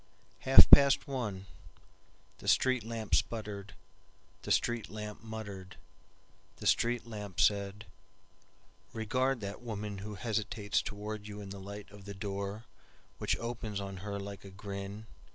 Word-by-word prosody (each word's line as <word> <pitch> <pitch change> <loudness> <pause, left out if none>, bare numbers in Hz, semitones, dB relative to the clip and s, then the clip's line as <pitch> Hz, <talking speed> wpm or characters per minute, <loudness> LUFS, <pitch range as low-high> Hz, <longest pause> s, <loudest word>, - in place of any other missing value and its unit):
Half 135 - +9
past 140 +1 +8
one, 110 -8 -3 0.9
The - - -10
street 130 -3 +4
lamp 115 -1 -5
sputtered, 100 -4 -1 0.7
The - - -4
street 120 -2 +1
lamp 105 0 -6
muttered, 100 -4 -7 0.8
The - - -9
street 120 0 +2
lamp 105 -5 -7
said, 100 +1 +2 1.1
"Regard 130 +3 0
that 100 0 -5
womanWho 105 -3 -5
hesitates 110 -2 0
toward 105 0 -5
you 105 0 -7
in 100 -1 -7
the 100 - -7
light 100 +1 -8
of 100 -1 -13
the 100 0 -7
doorWhich 100 +2 -5
opens 115 -3 -4
on 100 -1 -5
her 100 +1 -4
like 100 -1 -7
a 100 - -9
grin. 100 +1 -6
105 Hz, 130 wpm, -32 LUFS, 100-115 Hz, 1.1 s, Half